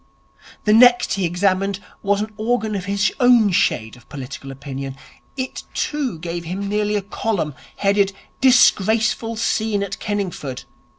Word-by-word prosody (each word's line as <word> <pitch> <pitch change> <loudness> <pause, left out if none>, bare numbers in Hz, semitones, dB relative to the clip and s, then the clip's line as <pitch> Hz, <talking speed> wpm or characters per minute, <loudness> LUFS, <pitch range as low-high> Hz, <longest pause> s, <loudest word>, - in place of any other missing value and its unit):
The 210 - +3
next 245 +2 +6
he 195 -2 0
examined 190 +2 0 0.2
was 200 0 +1
an 215 0 -5
organ 220 0 -1
of 190 -3 -3
his 200 -1 +1
own 245 -5 +5
shade 110 -10 +1
of 120 - -20
political 135 -1 -8
opinion. 135 0 -6 0.4
It 260 -1 -4
too, 280 - -2
gave 170 +1 -5
him 190 +4 -4
nearly 210 +1 0
a 205 - -1
column, 200 -6 -2 0.2
headed 200 0 +2 0.3
'Disgraceful 225 -3 +4
Scene 220 -2 0
at 195 0 -5
Kenningford'. 185 - -4
200 Hz, 140 wpm, -21 LUFS, 175-220 Hz, 0.4 s, next